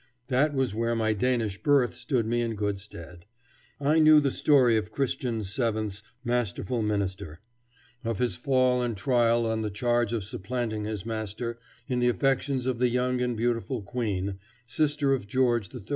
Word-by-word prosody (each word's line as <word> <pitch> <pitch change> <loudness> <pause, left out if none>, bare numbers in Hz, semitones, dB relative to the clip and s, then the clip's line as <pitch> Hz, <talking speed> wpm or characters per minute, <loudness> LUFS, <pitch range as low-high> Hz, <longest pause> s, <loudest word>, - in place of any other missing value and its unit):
That 140 +3 +2
was 130 -5 0
where 115 +2 0
my 110 -1 +1
Danish 110 -3 0
birth 140 -4 +3
stood 125 -6 -1
me 120 +1 0
in 115 -1 -2
good 100 -1 -2
stead. 85 -2 -11 0.5
I 150 +3 +3
knew 155 -1 +7
the 140 -2 +1
story 130 -6 +4
of 110 -1 -1
Christian 125 -3 -1
VII.'s 110 0 -2 0.2
masterful 120 -1 -1
minister; 95 -6 -2 0.6
of 115 -3 -2
his 125 +2 0
fall 130 -1 +2
and 120 -4 -2
trial 120 +2 +2
on 110 0 -1
the 110 - -2
charge 120 +2 0
of 115 -4 -1
supplanting 110 +2 -3
his 105 -3 -4
master 115 +1 -4 0.3
in 125 -2 -1
the 120 0 +3
affections 135 0 0
of 130 -2 -1
the 125 0 +3
young 125 +1 0
and 125 -2 -1
beautiful 120 0 -1
Queen, 100 -4 -3 0.3
sister 145 +1 +1
of 125 -7 -2
George 120 -3 +1
III. 125 -7 -9
120 Hz, 170 wpm, -27 LUFS, 105-125 Hz, 0.6 s, knew